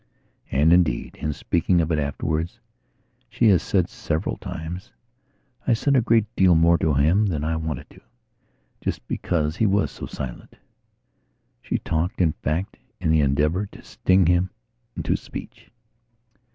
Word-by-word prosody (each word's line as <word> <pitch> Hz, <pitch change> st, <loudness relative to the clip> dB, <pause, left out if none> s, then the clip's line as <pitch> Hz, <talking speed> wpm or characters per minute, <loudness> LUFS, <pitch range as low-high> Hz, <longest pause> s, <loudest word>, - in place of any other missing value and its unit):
And, 75 Hz, +5 st, +4 dB
indeed, 90 Hz, -2 st, +2 dB
in 75 Hz, -, -1 dB
speaking 85 Hz, +4 st, +1 dB
of 85 Hz, 0 st, 0 dB
it 80 Hz, -, +1 dB
afterwards, 75 Hz, +3 st, -2 dB, 0.7 s
she 115 Hz, -, +3 dB
has 90 Hz, -5 st, +5 dB
said 90 Hz, -3 st, +1 dB
several 80 Hz, +4 st, -3 dB
times: 85 Hz, +5 st, -7 dB, 0.8 s
"I 125 Hz, -, +4 dB
said 140 Hz, +5 st, +2 dB
a 130 Hz, -, +5 dB
great 115 Hz, -2 st, +3 dB
deal 90 Hz, -2 st, +5 dB
more 85 Hz, +1 st, +4 dB
to 75 Hz, -3 st, +1 dB
him 85 Hz, +10 st, +3 dB
than 80 Hz, -6 st, -2 dB
I 80 Hz, +1 st, 0 dB
wanted 80 Hz, -4 st, -4 dB
to, -, -, -17 dB, 0.8 s
just -, -, -3 dB
because 80 Hz, -3 st, -1 dB
he 110 Hz, -, +3 dB
was 100 Hz, +1 st, +1 dB
so -, -, -7 dB
silent." 65 Hz, -2 st, -7 dB, 1.1 s
She -, -, -1 dB
talked, 85 Hz, +2 st, -2 dB
in 85 Hz, -4 st, +4 dB
fact, 80 Hz, +6 st, -3 dB, 0.2 s
in 80 Hz, -, +1 dB
the 80 Hz, -1 st, +4 dB
endeavour 75 Hz, +8 st, +1 dB
to -, -, -15 dB
sting 95 Hz, 0 st, +2 dB
him 90 Hz, +2 st, +3 dB, 0.5 s
into -, -, 0 dB
speech. -, -, -8 dB
85 Hz, 150 wpm, -24 LUFS, 75-95 Hz, 1.1 s, has